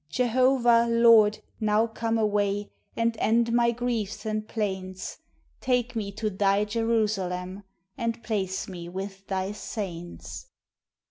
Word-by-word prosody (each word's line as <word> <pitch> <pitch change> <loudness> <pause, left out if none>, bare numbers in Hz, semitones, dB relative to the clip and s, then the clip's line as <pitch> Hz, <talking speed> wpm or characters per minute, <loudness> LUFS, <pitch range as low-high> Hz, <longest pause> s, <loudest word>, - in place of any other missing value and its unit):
Jehovah, 240 - +3
Lord, 230 -2 +5 0.2
now 215 +1 +3
come 225 0 -2
away, 205 -1 0 0.2
And 230 0 +1
end 230 +2 +2
my 235 0 +4
griefs 235 -3 -2
and 215 0 -2
plaints 190 -4 -4 0.4
Take 250 -1 0
me 205 -3 -2
to 215 +1 -2
Thy 200 +1 +2
Jerusalem, 205 -4 -1 0.4
And 230 -1 -2
place 195 -4 -2
me 175 -2 -7
with 195 +1 -7
Thy 190 0 -1
saints! 190 - -6
215 Hz, 120 wpm, -27 LUFS, 195-230 Hz, 0.4 s, Lord